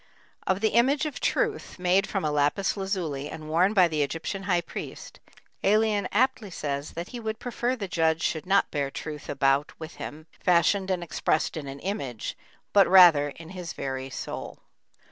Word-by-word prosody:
Of 190 Hz, +1 st, +1 dB
the 220 Hz, -, +3 dB
image 270 Hz, +7 st, +3 dB
of 305 Hz, -, -4 dB
Truth, -, -, -1 dB
made 185 Hz, +2 st, +2 dB
from 195 Hz, -5 st, -1 dB
a 150 Hz, -, +1 dB
lapis 145 Hz, +6 st, +1 dB
lazuli 175 Hz, -8 st, -3 dB
and 155 Hz, -1 st, -8 dB
worn 180 Hz, +7 st, +2 dB
by 185 Hz, -3 st, +6 dB
the 155 Hz, -2 st, -1 dB
Egyptian 165 Hz, +7 st, -3 dB
high 175 Hz, -2 st, +3 dB
priest, -, -, -8 dB, 0.4 s
Ælian 210 Hz, 0 st, +3 dB
aptly 240 Hz, -1 st, +1 dB
says 145 Hz, -4 st, -4 dB
that 170 Hz, +2 st, -5 dB
he 245 Hz, -, -6 dB
would 220 Hz, -1 st, -3 dB
prefer 245 Hz, +1 st, -2 dB
the 205 Hz, -6 st, -5 dB
judge 165 Hz, -2 st, +1 dB
should 160 Hz, +1 st, -1 dB
not 195 Hz, +1 st, +3 dB
bear 140 Hz, -2 st, -1 dB
Truth 150 Hz, +1 st, -7 dB
about 135 Hz, +1 st, +1 dB
with 160 Hz, 0 st, -8 dB
him, 155 Hz, +1 st, -7 dB
fashioned 185 Hz, +2 st, +3 dB
and 180 Hz, -2 st, 0 dB
expressed 160 Hz, -1 st, 0 dB
in 150 Hz, -3 st, -5 dB
an 135 Hz, +1 st, -7 dB
image, 140 Hz, -, -4 dB, 0.4 s
but 200 Hz, -1 st, +6 dB
rather 175 Hz, -6 st, +7 dB
in 160 Hz, +3 st, -11 dB
his 180 Hz, -3 st, -6 dB
very 135 Hz, 0 st, -4 dB
soul. -, -, -6 dB
175 Hz, 180 wpm, -27 LUFS, 150-200 Hz, 0.4 s, rather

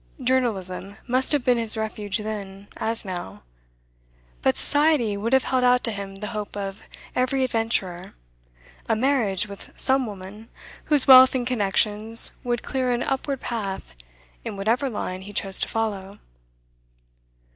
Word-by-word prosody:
Journalism 205 Hz, -7 st, -1 dB
must 255 Hz, +1 st, +1 dB
have 290 Hz, -4 st, +1 dB
been 245 Hz, -2 st, +3 dB
his 225 Hz, -1 st, +7 dB
refuge 215 Hz, -2 st, -2 dB
then, 200 Hz, -2 st, -6 dB
as 225 Hz, 0 st, -2 dB
now; 175 Hz, -, -7 dB, 1.0 s
but 130 Hz, -, +2 dB
Society 290 Hz, -8 st, +2 dB
would 215 Hz, +4 st, -3 dB
have 265 Hz, 0 st, +4 dB
held 255 Hz, -1 st, 0 dB
out 250 Hz, 0 st, +4 dB
to 230 Hz, -, -1 dB
him 200 Hz, -2 st, -6 dB
the 210 Hz, +1 st, -6 dB
hope 210 Hz, -1 st, -5 dB
of 195 Hz, 0 st, -5 dB, 0.3 s
every 260 Hz, +1 st, +1 dB
adventurer 225 Hz, -7 st, -2 dB, 0.7 s
a 225 Hz, -, +3 dB
marriage 220 Hz, -5 st, +1 dB
with 200 Hz, -1 st, -12 dB
some 265 Hz, -1 st, +3 dB
woman 205 Hz, +2 st, -10 dB, 0.4 s
whose 295 Hz, -4 st, +2 dB
wealth 260 Hz, -1 st, +8 dB
and 250 Hz, -2 st, -1 dB
connections 215 Hz, -1 st, +2 dB
would 240 Hz, -2 st, -2 dB
clear 260 Hz, -1 st, -1 dB
an 245 Hz, 0 st, 0 dB
upward 270 Hz, 0 st, -2 dB
path 200 Hz, -, -5 dB, 0.5 s
in -, -, -6 dB
whatever 230 Hz, +7 st, 0 dB
line 185 Hz, -5 st, -5 dB
he 200 Hz, +2 st, -10 dB
chose 195 Hz, -1 st, 0 dB
to -, -, -1 dB
follow. 205 Hz, -3 st, -3 dB
220 Hz, 145 wpm, -24 LUFS, 200-255 Hz, 1.0 s, wealth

